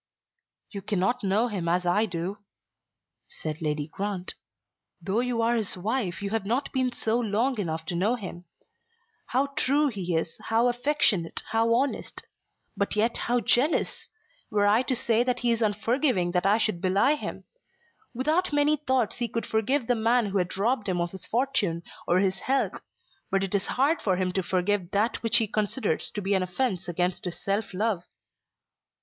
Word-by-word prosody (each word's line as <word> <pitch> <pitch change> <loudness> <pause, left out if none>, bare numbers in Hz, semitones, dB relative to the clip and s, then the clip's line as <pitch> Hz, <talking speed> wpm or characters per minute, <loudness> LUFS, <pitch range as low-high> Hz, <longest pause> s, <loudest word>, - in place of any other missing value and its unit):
"You 200 - -6
cannot 205 +4 0
know 205 +5 +2
him 185 -7 -2
as 180 +1 +1
I 205 +5 +2
do," 180 +3 -4 0.9
said 155 0 -5
Lady 150 -2 -1
Grant. 190 +2 -3 0.7
"Though 190 +5 -1
you 245 -2 0
are 230 +1 +3
his 220 -5 0
wife 200 -1 -2
you 200 - -3
have 225 -2 0
not 240 +8 -1
been 260 -2 +1
so 230 0 0
long 230 +3 0
enough 160 -4 -3
to 175 - -3
know 205 +8 +2
him; 185 -6 -8 0.8
how 270 +3 +1
true 285 +2 +3
he 185 -7 -3
is, 160 0 -2
how 230 +2 +3
affectionate, 245 - +1
how 225 +1 +3
honest; 270 +3 -2 0.5
but 200 - 0
yet 225 +3 +2
how 245 0 +3
jealous! 275 +8 +2 0.4
Were 205 -1 +2
I 210 +3 +5
to 255 0 -1
say 230 0 +2
that 250 0 -1
he 240 -1 +2
is 230 0 0
unforgiving 215 - +1
I 195 +4 +3
should 215 -6 0
belie 195 +9 +3
him. 300 - -5 0.7
Without 310 +9 0
many 295 +1 +3
thoughts 260 -5 0
he 240 - 0
could 230 0 -3
forgive 230 +5 +1
the 245 - +2
man 230 +1 +2
who 200 -1 0
had 180 +1 -2
robbed 215 0 0
him 180 -1 0
of 170 0 -1
his 190 -2 -9
fortune, 225 -9 0 0.2
or 175 - +3
his 190 -1 +1
health. 270 +6 0 0.5
But 195 0 +1
it 195 - -3
is 200 -1 +1
hard 285 +6 +1
for 190 -3 +1
him 185 0 0
to 190 - 0
forgive 185 0 0
that 210 +4 +1
which 230 0 +3
he 225 - +3
considers 215 +4 -1
to 205 - -3
be 195 +1 +1
an 190 - +2
offence 185 0 -1
against 180 +2 -1
his 180 - -4
self 200 +2 -1
love." 200 -2 -1
210 Hz, 180 wpm, -27 LUFS, 185-245 Hz, 0.9 s, I